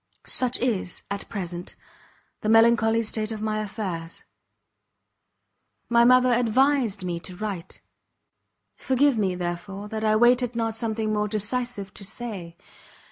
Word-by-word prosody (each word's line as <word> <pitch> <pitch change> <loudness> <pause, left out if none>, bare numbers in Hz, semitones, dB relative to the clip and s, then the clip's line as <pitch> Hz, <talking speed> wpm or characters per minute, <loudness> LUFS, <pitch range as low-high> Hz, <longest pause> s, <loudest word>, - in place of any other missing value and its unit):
Such 255 -1 0
is, 225 -7 -1
at 200 - -5
present, 175 -4 -5 0.7
the 215 - -1
melancholy 225 0 +5
state 215 0 -3
of 220 - -4
my 215 0 -1
affairs. 190 -6 -5 1.7
My 235 0 +5
mother 255 0 +5
advised 245 -3 +2
me 175 -2 -3
to 180 +1 -8
write; 190 -3 -6 0.9
forgive 265 -2 +2
me, 190 -3 +1
therefore, 180 +3 -5
that 220 0 -4
I 215 0 +3
waited 240 +1 +4
not 225 -1 -1
something 220 -1 -1
more 210 0 0
decisive 215 -1 -2
to - - -7
say. 195 -6 -6
215 Hz, 130 wpm, -25 LUFS, 195-235 Hz, 1.7 s, melancholy